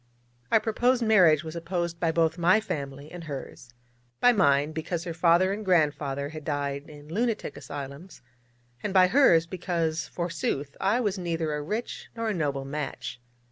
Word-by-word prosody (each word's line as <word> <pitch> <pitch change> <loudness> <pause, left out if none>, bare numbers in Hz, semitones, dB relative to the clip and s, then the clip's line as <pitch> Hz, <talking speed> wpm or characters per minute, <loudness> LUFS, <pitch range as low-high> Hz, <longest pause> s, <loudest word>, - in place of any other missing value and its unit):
Our - - +6
proposed 240 +3 +1
marriage 180 -9 +5
was 160 0 -7
opposed 170 0 -3
by 165 -2 +1
both 165 +1 +1
my 180 +5 +5
family 140 -7 -5
and 175 -2 -8
hers: 135 -4 -8 0.5
by 245 - +6
mine, 145 - +3
because 160 +2 -3
her 170 - -4
father 175 +3 +3
and 215 +2 -5
grandfather 145 -6 +1
had 155 0 -8
died 145 0 -3
in 145 -1 -12
lunatic 225 +1 -1
asylums; 145 +4 -8 0.6
and 200 - -3
by 185 -1 +8
hers, 180 - +5
because, 170 -2 -2
forsooth, 165 -5 -3
I 200 +5 +2
was 205 -4 -1
neither 165 -3 -2
a 150 - -2
rich 215 +11 -4
nor 230 -1 -2
a - - 0
noble 140 -6 -2
match. 140 -4 -5
165 Hz, 165 wpm, -27 LUFS, 145-185 Hz, 0.6 s, by